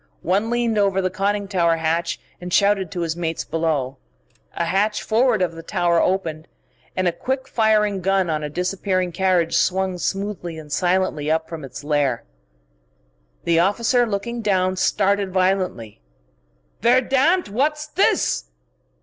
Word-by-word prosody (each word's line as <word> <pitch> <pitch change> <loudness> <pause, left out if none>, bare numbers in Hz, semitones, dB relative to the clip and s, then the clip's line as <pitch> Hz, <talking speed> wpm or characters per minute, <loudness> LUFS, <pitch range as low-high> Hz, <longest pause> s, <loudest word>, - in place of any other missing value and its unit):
One 200 +6 +1
leaned 235 -2 +1
over 195 -1 +2
the 185 -1 0
conning 200 +2 -1
tower 170 -4 +2
hatch 165 +1 -1 0.2
and 180 0 -6
shouted 200 -1 +3
to 175 - -4
his 165 -1 -2
mates 165 -2 -3
below. 150 -5 -1 0.6
A 170 - -1
hatch 205 +5 0
forward 225 -2 +2
of 175 - 0
the 165 0 -9
tower 170 0 +1
opened, 165 -4 -1 0.5
and 185 -1 +1
a - - +3
quick 260 +9 -3
firing 215 -4 +2
gun 190 0 +1
on 155 -2 -1
a 150 - -3
disappearing 185 +2 -1
carriage 175 -2 +1
swung 185 0 +1
smoothly 195 -4 -3
and 150 -2 -10
silently 175 -4 0
up 160 0 0
from 165 -3 -7
its 135 +2 -9
lair. 145 -5 0 1.2
The 165 -1 +2
other 180 +3 +5
officer, 235 +3 +1
looking 230 +3 -3
down, 185 -3 +1
started 200 0 +1
violently. 185 - -1 0.8
"Verdammt! 265 - +3
What's 300 +8 0
this?" 320 +6 +1
185 Hz, 150 wpm, -22 LUFS, 165-205 Hz, 1.2 s, other